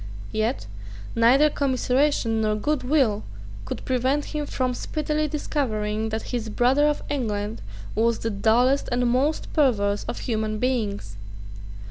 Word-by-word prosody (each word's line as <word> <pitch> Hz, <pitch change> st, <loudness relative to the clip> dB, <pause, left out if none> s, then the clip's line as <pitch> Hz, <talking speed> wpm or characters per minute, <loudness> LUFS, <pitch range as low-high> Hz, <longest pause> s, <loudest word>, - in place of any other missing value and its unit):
Yet 220 Hz, +4 st, -1 dB, 0.5 s
neither 260 Hz, +6 st, +5 dB
commiseration 260 Hz, -4 st, +1 dB
nor 215 Hz, -1 st, +1 dB
good 295 Hz, +7 st, 0 dB
will 250 Hz, -6 st, +2 dB, 0.4 s
could -, -, -6 dB
prevent 260 Hz, +3 st, +1 dB
him 300 Hz, -1 st, -4 dB
from 255 Hz, -2 st, -1 dB
speedily 305 Hz, +4 st, -1 dB
discovering 220 Hz, -8 st, -2 dB
that 220 Hz, 0 st, -3 dB
his 230 Hz, -2 st, -2 dB
brother 255 Hz, +7 st, +3 dB
of 295 Hz, -, -1 dB
England 215 Hz, -5 st, -2 dB, 0.3 s
was 230 Hz, +1 st, +2 dB
the 225 Hz, -, -3 dB
dullest 240 Hz, +7 st, +2 dB
and 245 Hz, 0 st, +1 dB
most 265 Hz, +6 st, 0 dB
perverse 205 Hz, -9 st, +2 dB
of -, -, -5 dB
human 215 Hz, -2 st, -1 dB
beings. 210 Hz, -, -2 dB
245 Hz, 130 wpm, -24 LUFS, 215-280 Hz, 0.5 s, neither